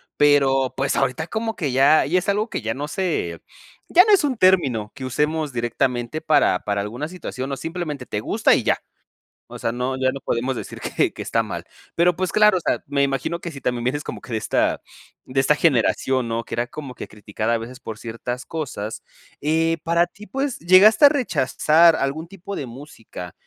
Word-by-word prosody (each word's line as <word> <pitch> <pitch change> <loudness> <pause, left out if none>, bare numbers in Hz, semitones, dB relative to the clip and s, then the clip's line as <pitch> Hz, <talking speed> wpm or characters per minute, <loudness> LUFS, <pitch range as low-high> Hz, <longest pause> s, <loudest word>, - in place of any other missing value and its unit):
pero, 135 -3 +3
pues, 135 +1 0
ahorita 135 +4 0
como 225 +2 -3
que 145 -6 -2
ya 140 +4 +5
ya 185 - +2
es 190 - -4
algo 210 +3 0
que, - - -4
ya, 115 0 -2
no 145 +4 -5
se 150 - -2 0.5
ya 360 - +7
no 430 - +5
es 390 - +5
un 270 -5 0
término 140 - +2
que 135 - -8
usemos 150 +4 -1
directamente 120 +3 -2
para 155 -12 +3
para 100 -1 -2
alguna 120 +10 -4
situación, 140 -7 -6
o 135 - -3
simplemente 155 -3 -5
te 105 -2 -4
gusta - - +3
y - - -1
ya, - - +2 0.7
o - - -9
sea, 115 - -2
no, 125 +2 -2
ya 130 0 +1
no 135 - -6
podemos 125 0 -2
decir - - -8
que - - 0
que - - -8
está - - 0
mal. - - -6 0.3
Pero, 175 +1 +4
pues, 185 +1 -3
claro, 210 -2 +5
o - - -1
sea, - - -1
me 140 0 0
imagino 135 +5 -1
que 170 - -6
si 140 -3 -10
también 120 -1 -2
vienes 145 +4 -1
como - - -6
que 125 - -9
de 110 - +1
esta - - 0 0.4
de 130 +1 -2
esta 135 +3 +3
generación, 130 -3 +1
¿no?, 115 0 -2
que - - -6
era 120 +1 -1
como 145 -2 -8
que - - -8
criticada 105 +2 -3
a - - +2
veces 120 +3 -9
por 110 -4 -7
ciertas 120 +2 -5
cosas, 125 -9 -5 0.4
eh, 165 +2 +1
para 170 +1 +2
ti, 210 +4 -14
pues, 270 -1 -3
¿llegaste 190 - +6
a 285 - +10
rechazar 165 - +3
algún 150 +3 -2
tipo 195 +2 -8
de 140 - -4
música, 115 - -10
140 Hz, 210 wpm, -22 LUFS, 125-170 Hz, 0.7 s, a